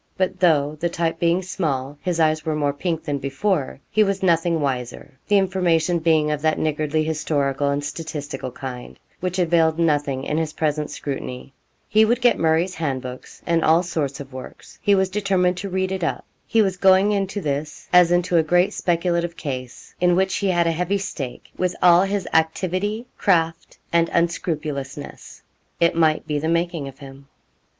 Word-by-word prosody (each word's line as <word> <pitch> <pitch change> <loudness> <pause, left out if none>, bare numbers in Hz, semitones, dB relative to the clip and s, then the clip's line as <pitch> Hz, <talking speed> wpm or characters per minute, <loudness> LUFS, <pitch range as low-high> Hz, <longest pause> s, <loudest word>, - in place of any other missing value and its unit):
But 185 -1 -1
though, 155 -4 +2
the 170 - 0
type 165 -1 -2
being 170 +2 +2
small, 145 -7 -2
his 180 -2 -2
eyes 155 -1 +2
were 155 -1 -1
more 145 -2 0
pink 165 +2 -3
than 145 -2 -2
before, 140 +2 -1
he 215 - +4
was 195 -1 -1
nothing 170 -2 +2
wiser, 130 0 -4
the 205 - +4
information 175 -3 +1
being 155 -2 +2
of 150 -1 -2
that 155 0 +1
niggardly 155 0 0
historical 145 -3 0
and 140 +1 -1
statistical 150 -3 -5
kind 125 -1 -8 0.2
which 180 0 -3
availed 165 -2 +3
nothing 145 -5 +1
in 150 +3 -1
his 160 -1 -2
present 150 -1 -1
scrutiny. 135 -1 -6 0.3
He 215 +1 +4
would 235 +3 +2
get 245 -1 +3
Murray's 165 +3 +2
handbooks, 130 -6 -5
and 170 -1 +1
all 165 +3 +4
sorts 150 -6 -3
of 135 -2 -9
works 130 0 -11
he 205 -2 +4
was 190 0 +2
determined 185 -2 +1
to 200 +2 -4
read 190 0 -1
it 190 -2 -3
up. 165 - -2 0.2
He 225 -1 +3
was 190 -2 -1
going 190 +2 +5
into 200 0 -1
this 150 -2 -4
as 180 -1 +6
into 175 0 +2
a - - +6
great 175 +4 +2
speculative 170 0 0
case, 130 -4 -6
in 175 -1 +4
which 190 +1 +1
he 200 - -1
had 175 -2 +2
a 165 - +2
heavy 180 +4 0
stake, 155 -10 -6
with 180 -1 -1
all 175 0 +6
his 195 -2 -1
activity, 185 +7 0
craft, 165 -4 +1 0.2
and 170 0 +3
unscrupulousness. 150 -4 -3 0.4
It 170 0 +3
might 160 -2 +2
be 150 -2 -1
the 160 - -2
making 170 -3 -1
of 135 -1 -10
him. 135 0 -12
165 Hz, 180 wpm, -22 LUFS, 145-180 Hz, 0.4 s, as